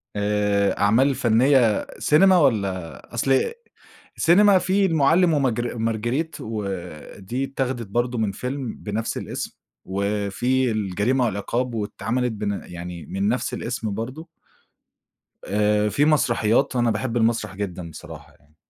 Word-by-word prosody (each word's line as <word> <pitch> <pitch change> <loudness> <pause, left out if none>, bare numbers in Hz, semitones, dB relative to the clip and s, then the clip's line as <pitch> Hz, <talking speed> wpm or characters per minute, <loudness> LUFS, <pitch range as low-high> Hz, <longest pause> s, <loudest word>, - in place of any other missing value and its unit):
آآ 105 -1 +1
أعمال 125 +7 +3
فنِّية 120 0 +3
سينما 185 +5 +5
والّا 100 - -1
أصل 135 - +1 0.7
سينما 195 +3 +5
في 190 +2 +2
المُعَلِّم 165 +1 +3
وماجر 120 -4 0
مارجريت 120 +8 -1
ودي 100 - -5
اتّاخدت 130 -4 -3
برضه 120 +4 -1
من 110 -3 0
فيلم 125 +3 -4
بنَفْس 110 +2 -3
الاسم - - -5 0.3
وفي 105 +6 0
الجريمة 110 +5 0
والعقاب 120 +4 -2
واتعملت 115 +3 -2
بن 100 -2 -3
يعني 85 -1 -8
من 95 +1 -2
نَفْس 125 - -1
الاسم 115 -3 -3
برضه. 130 +10 -6 1.2
آآ 105 +1 +1
في 145 +7 +2
مسرحيات 130 -4 +2
وأنا 120 -2 +2
باحِب 115 +2 -2
المسرح 110 -4 0
جدًا 90 -4 -5
بصراحة 80 - -11
يعني. 75 +1 -29
115 Hz, 120 wpm, -23 LUFS, 100-130 Hz, 1.2 s, سينما